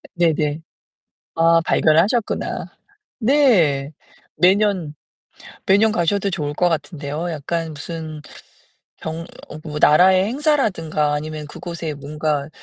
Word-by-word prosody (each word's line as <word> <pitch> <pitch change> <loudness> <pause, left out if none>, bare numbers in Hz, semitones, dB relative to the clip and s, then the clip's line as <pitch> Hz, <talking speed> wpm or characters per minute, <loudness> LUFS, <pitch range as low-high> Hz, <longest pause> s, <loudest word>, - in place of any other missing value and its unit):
네네. 155 -3 +1 0.7
아 165 0 +4
발견을 155 +1 +4
하셨구나. 225 +2 -2 0.5
네. 205 - +3 0.4
매년 185 -4 +2 0.7
매년 210 +2 +4
가셔도 195 +3 0
좋을 150 -6 -3
것 180 +3 +2
같은데요. 150 +1 -4
약간 160 +1 -3
무슨 155 0 -7 0.8
병 160 +1 -5 0.2
어, 150 - -9
뭐 150 -1 -5
나라의 185 +5 +5
행사라든가 215 - 0
아니면 150 0 -5
그곳에 170 -1 -6
뭔가 145 0 -3
165 Hz, 230 characters per minute, -20 LUFS, 150-190 Hz, 0.8 s, 나라의